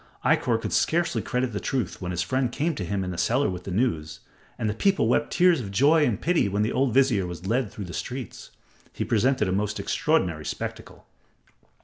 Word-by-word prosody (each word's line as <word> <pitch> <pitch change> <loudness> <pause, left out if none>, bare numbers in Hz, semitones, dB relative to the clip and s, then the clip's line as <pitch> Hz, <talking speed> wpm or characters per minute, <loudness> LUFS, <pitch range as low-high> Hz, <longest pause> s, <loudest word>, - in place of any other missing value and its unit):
Ikkor - - +2
could - - -4
scarcely 170 +1 +1
credit 125 -2 -2
the 100 - -2
truth 125 -9 -3
when 90 - -4
his 90 -1 -1
friend 130 +2 0
came 160 +6 -1
to 105 - -4
him 95 +2 -2
in 90 - -4
the 85 - -5
cellar 105 +6 +2
with 90 -1 -7
the - - -5
news, 85 -8 -1 0.4
and 110 - -2
the 105 - 0
people 195 - +2
wept - - +1
tears 175 -5 +4
of 100 - -6
joy 145 +9 +4
and 115 -7 0
pity 170 - +1
when 100 +2 0
the 110 - 0
old 135 -1 +1
vizier 115 -7 +3
was 90 +1 -8
led 115 +2 0
through 100 - -7
the 85 - -8
streets. 130 -1 -6 0.4
He - - -4
presented 120 0 +2
a - - -1
most 105 +2 -1
extraordinary 95 - 0
spectacle. - - -6
110 Hz, 215 wpm, -25 LUFS, 95-135 Hz, 0.4 s, tears